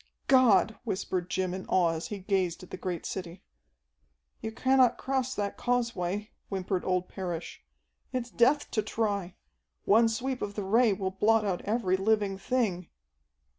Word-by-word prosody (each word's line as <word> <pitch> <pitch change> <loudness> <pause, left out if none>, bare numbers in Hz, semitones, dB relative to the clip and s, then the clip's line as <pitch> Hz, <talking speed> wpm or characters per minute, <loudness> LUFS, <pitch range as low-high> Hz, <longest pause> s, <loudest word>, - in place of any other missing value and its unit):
"God!" 230 -5 +4
whispered 185 -4 -2
Jim 185 0 -1
in 185 0 -6
awe 180 -2 +3
as 160 0 -4
he 210 - -5
gazed 185 -3 -1
at 185 - -13
the - - -4
great 180 -3 -4
city. 180 -1 -6 1.0
"You 220 - -4
cannot 260 +1 +3
cross 260 -1 -1
that 205 -1 -3
causeway," 215 -5 -1 0.2
whimpered 190 -1 -2
old 180 -1 0
Parrish. 175 -3 -6 0.5
"It's 245 -2 -3
death 275 +5 +3
to 215 - +1
try. 205 -4 -2 0.5
One 225 +3 +5
sweep 250 +3 -2
of 205 0 -4
the 205 - -3
Ray 225 +4 +4
will 190 -1 -2
blot 215 +3 +3
out 185 -3 -1
every 205 -4 +1
living 200 -1 +1
thing." 195 -6 -1
200 Hz, 155 wpm, -29 LUFS, 185-235 Hz, 1.0 s, One